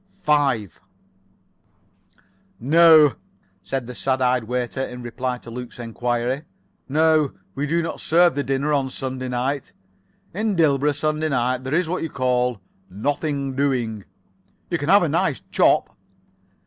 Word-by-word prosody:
5 135 - 0 1.8
"No," 155 +2 +6 0.4
said 135 +4 -4
the 125 - -8
sad 130 +1 -1
eyed 125 -2 +1
waiter, 125 +2 -3
in 125 -1 -7
reply 125 +1 -3
to 120 - -12
Luke's 125 +1 -8
enquiry. 120 +2 -2 0.5
"No, 155 0 +3 0.2
we 140 +2 -2
do 170 +3 +1
not 165 - -5
serve 170 +1 +4
the 145 - -2
dinner 135 +3 0
on 135 -2 +1
Sunday 130 0 -5
night. 130 +3 -2 0.6
In 210 +2 -1
Dilborough 150 -3 +3
Sunday 155 +2 -1
night, 125 -1 0
there 130 +3 -1
is 175 0 +1
what 180 +3 -2
you 165 - -3
call, 125 -3 0 0.3
nothing 140 - -2
doing. 125 -7 -1 0.7
You - - 0
can - - -3
have - - +6
a - - +1
nice - - 0
chop." - - +2
135 Hz, 140 wpm, -22 LUFS, 125-150 Hz, 1.8 s, No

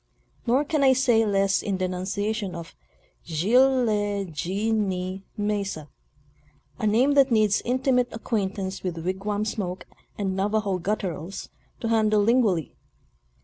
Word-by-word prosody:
Nor 260 +5 +3
can 300 -2 0
I 265 -1 +6
say 240 -4 +3
less 195 -1 +2
in 195 -2 -2
denunciation 190 +2 -2
of 170 -1 -8 0.3
" - - -34
Zilh 250 - +3
le 205 -2 0
ji 190 +8 -2
ni 190 -3 -1
Mesa 200 -7 -2 0.9
"—a 215 - 0
name 240 +7 +3
that 275 -1 +5
needs 215 -3 +3
intimate 250 0 +1
acquaintance 195 -4 -3
with 170 -3 -4
wigwam 205 +3 -2
smoke 190 -4 -4 0.3
and 195 -2 -1
Navajo 200 -1 0
gutturals 185 -2 -4 0.3
to 230 - -1
handle 215 -2 +3
lingually. 220 - +2
205 Hz, 130 wpm, -25 LUFS, 190-225 Hz, 0.9 s, I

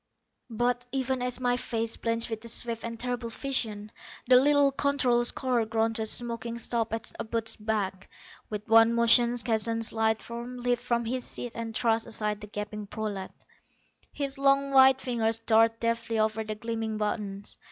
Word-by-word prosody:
But, 245 +2 0
even 265 -1 -1
as 250 0 -1
my 245 -1 +1
face 230 -2 -1
blanched 230 0 -1
with 220 -1 -4
the 230 - -5
swift 230 0 +1
and 230 0 -6
terrible 245 -1 -3
vision, 220 -5 -3 0.4
the 250 0 +7
little 285 0 +4
controller's 255 -4 +2
car 250 -3 0
ground 225 0 0
to - - -3
a - - -1
smoking 235 0 -1
stop 230 -1 -2
at 225 0 -4
Abud's 225 0 +1
back. 205 -3 -3 0.4
With 210 -1 -5
one 225 +1 +6
motion 235 +1 +4
Keston's 225 -1 -1
lithe 220 0 +1
form 240 +2 -7
leaped 245 0 0
from 235 -1 -1
his 250 +2 -2
seat 245 - -6
and 230 -1 -6
thrust 225 -1 +1
aside 210 -1 -2
the 210 - -8
gaping 210 0 -6
prolat. 205 -3 -5 0.8
His 275 -1 -4
long 275 0 +3
white 265 -1 +6
fingers 230 -4 +1
darted 225 0 +3
deftly 230 -1 -1
over 220 0 0
the 215 0 -5
gleaming 225 -1 -4
buttons. 205 -2 -3
230 Hz, 170 wpm, -28 LUFS, 220-245 Hz, 0.8 s, the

